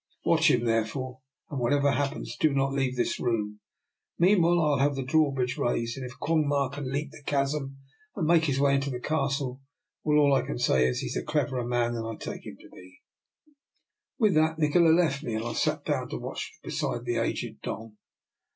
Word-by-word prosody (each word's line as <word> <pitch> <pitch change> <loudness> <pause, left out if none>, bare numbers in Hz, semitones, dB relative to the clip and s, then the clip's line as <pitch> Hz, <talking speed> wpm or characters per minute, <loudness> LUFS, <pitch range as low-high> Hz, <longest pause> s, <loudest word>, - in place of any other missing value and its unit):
Watch - - +4
him, 120 -1 +2
therefore, 120 +3 -1 0.3
and 140 - -3
whatever 140 +4 +2
happens 135 -1 -2
do 155 +5 +2
not 135 0 +1
leave 135 -2 0
this 120 - -1
room. 105 -3 -1 0.6
Meanwhile, 175 -1 +4
I 165 - +2
will 145 - +2
have 140 +1 +2
the 135 - -2
drawbridge 135 -2 +1
raised, 115 -1 0
and 135 - -6
if 125 -1 -8
Quong 155 -1 +1
Ma 140 -2 +1
can 135 -1 -5
leap 140 +1 -2
the 145 - -13
chasm, 140 -1 -1 0.4
and 175 - -1
make 165 0 +4
his 135 -3 0
way 140 0 +4
into 140 0 +1
the 125 -2 -4
Castle, 135 -2 -1 0.4
well, 150 -1 +3
all 145 -2 +5
I 135 - +4
can - - -4
say 65 0 +3
is, 65 - -1
he - - -4
is - - -3
a - - -2
cleverer 130 -5 -1
man 120 -1 +1
than 115 -1 -3
I 115 - -4
take - - -7
him - - -9
to - - -15
be." 90 0 -15 1.2
With 215 -6 +3
that, 160 +1 +2
Nikola 160 +2 +4
left 160 -4 +3
me, 115 - -3
and 110 +1 -3
I 120 - -3
sat - - -1
down - - -1
to - - -4
watch - - -5
beside 120 0 -3
the 120 -1 -1
aged 115 - -2
Don. 110 -1 -6
135 Hz, 210 wpm, -27 LUFS, 120-150 Hz, 1.2 s, all